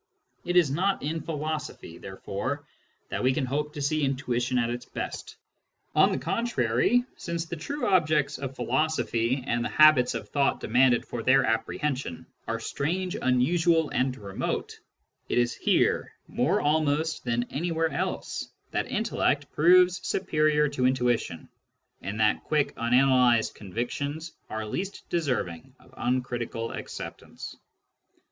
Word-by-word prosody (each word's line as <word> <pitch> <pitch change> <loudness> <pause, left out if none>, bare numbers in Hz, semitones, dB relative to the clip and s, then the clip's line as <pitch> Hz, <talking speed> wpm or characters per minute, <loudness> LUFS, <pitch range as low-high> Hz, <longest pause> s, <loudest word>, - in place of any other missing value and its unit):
It 175 - -1
is 170 -6 +5
not 190 +6 0
in 160 +3 -2
philosophy, 150 - -5
therefore, 115 +9 -5 0.4
that - - -2
we 130 +1 +3
can 135 -1 0
hope 150 +3 -2
to 150 - -5
see 155 +2 +1
intuition 125 -2 0
at 120 -1 +1
its 120 0 -4
best. - - -6 0.6
On - - +5
the - - 0
contrary, 230 - +1
since 170 -1 -3
the 170 - -5
true 280 - -4
objects 155 -6 +2
of 135 -1 -5
philosophy, 130 -2 0
and 120 -2 0
the - - -2
habits 155 -5 +5
of - - -5
thought 140 -1 +1
de - - -6
manded 125 +1 +4
for 120 - -5
their 135 +4 +4
apprehension, 125 - -2 0.2
are - - -2
strange, 180 +5 -2
unusual, 160 +5 +2
and 130 0 0
remote, 100 -4 -4 0.5
it - - 0
is 120 0 +2
here, - - +1 0.2
more 160 +12 +1
almost 155 +1 +1
than 120 -1 0
anywhere 165 +1 0
else, - - -3 0.2
that - - -1
intellect - - 0
proves 180 +3 +5
superior 155 -4 +2
to 130 -3 +1
intuition, 120 -10 0 0.5
and 100 +4 -5
that 105 -1 +2
quick 150 -2 +1
unanalysed 125 -1 +3
convictions 140 - -4 0.2
are 110 0 -4
least 190 - -5
deserving 125 - -2
of - - -21
uncritical 120 -2 -2
acceptance. - - -8
140 Hz, 140 wpm, -27 LUFS, 120-160 Hz, 0.6 s, is